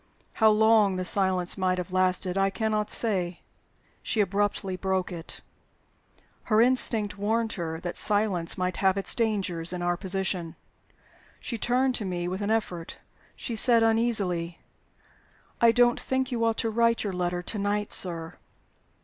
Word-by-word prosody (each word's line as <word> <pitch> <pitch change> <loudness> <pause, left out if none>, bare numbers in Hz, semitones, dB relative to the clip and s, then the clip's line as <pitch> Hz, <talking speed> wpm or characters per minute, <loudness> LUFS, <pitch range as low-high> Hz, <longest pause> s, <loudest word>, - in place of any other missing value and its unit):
How 220 - +4
long 215 -2 +4
the 185 0 -3
silence 185 -2 +1
might 185 -1 +1
have 180 0 -5
lasted 185 0 +1
I 195 0 +2
cannot 215 +1 -2
say. 185 -6 -1 0.6
She 225 - -2
abruptly 200 -1 0
broke 190 0 -2
it. 170 -1 -8 1.0
Her 215 -1 +2
instinct 225 -4 +3
warned 225 +2 -1
her 160 -3 -5
that 175 - -5
silence 205 -5 0
might 180 0 -2
have 190 0 +2
its 195 - +4
dangers, 190 -7 -1
in 180 -1 -4
our 175 0 +1
position. 185 -3 -3 0.8
She 235 - -5
turned 255 +3 +1
to - - -3
me 175 -2 -3
with 185 +3 -4
an 205 - -2
effort; 185 -7 -3 0.4
she 235 - -5
said, 230 0 +4
uneasily, 205 -7 0 1.0
"I 235 -1 +6
don't 240 +1 +3
think 260 0 -2
you 235 -2 -1
ought 225 -1 0
to 225 -2 -1
write 230 +1 +2
your 200 -3 -3
letter 180 0 -2
to 210 - -4
night, 205 +1 -2
sir." 165 -2 -3
200 Hz, 155 wpm, -26 LUFS, 180-225 Hz, 1.0 s, I